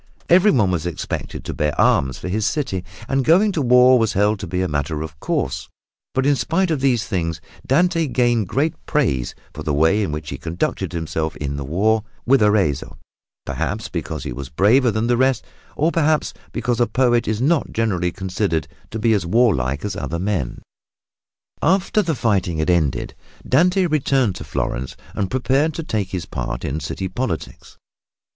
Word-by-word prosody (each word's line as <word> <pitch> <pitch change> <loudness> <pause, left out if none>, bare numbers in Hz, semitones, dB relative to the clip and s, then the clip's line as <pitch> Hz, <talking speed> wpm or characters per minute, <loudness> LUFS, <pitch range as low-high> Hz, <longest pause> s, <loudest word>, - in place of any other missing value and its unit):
Everyone 170 - +5
was 85 -1 -1
expected 85 - -5
to - - -4
bear 75 0 -1
arms 65 -2 +3
for - - -6
his 105 +4 -1
city, 130 - -2 0.2
and 135 0 +1
going 185 - +4
to 165 - -1
war 125 0 +6
was 115 -2 +1
held 105 +1 +2
to 95 - -5
be 90 +2 -1
a - - 0
matter 75 0 -2
of 75 -2 -9
course; - - -2 0.5
but 130 0 +1
in 145 0 +4
spite 165 +9 0
of 155 - 0
these 125 -5 +2
things 85 -5 -2 0.3
Dante 165 +3 +2
gained 120 -4 +1
great 150 - 0
praise 65 - 0 0.2
for - - -7
the 70 - -1
way 80 +8 +3
in 95 - -1
which 75 0 -5
he - - -5
conducted 85 +1 -2
himself 80 -1 -3
in 70 -1 -4
the 70 - -4
war 105 +10 +1 0.2
with 135 0 +4
Arezzo, 105 -9 +1 0.5
perhaps - - -3
because - - -4
he - - -4
was 65 0 -7
braver 115 - +4
than 110 +1 0
the 120 0 +2
rest, 130 -1 +2 0.3
or 160 +3 +2
perhaps 155 -2 +1 0.2
because 120 -1 -1
a 120 - +3
poet 120 0 +2
is 110 0 0
not 150 +5 +1
generally 90 -6 0
considered 90 -4 -2 0.2
to - - -5
be 110 +1 +2
as 95 -5 0
warlike 85 - +2
as 100 -2 -3
other 85 -3 -3
men. 90 -9 -2 1.0
After 190 +5 +2
the 165 -6 -1
fighting 100 -9 0
had 80 +3 +1
ended, 80 -6 0 0.3
Dante 180 +7 +3
returned 135 - +1
to - - -7
Florence 65 +2 -3 0.2
and 95 -2 -2
prepared 135 +6 +1
to 165 - -3
take 105 -9 -2
his 90 -3 -4
part - - -4
in 75 +3 -2
city 80 +5 -4
politics. 90 -3 -5
105 Hz, 180 wpm, -21 LUFS, 85-135 Hz, 1.0 s, war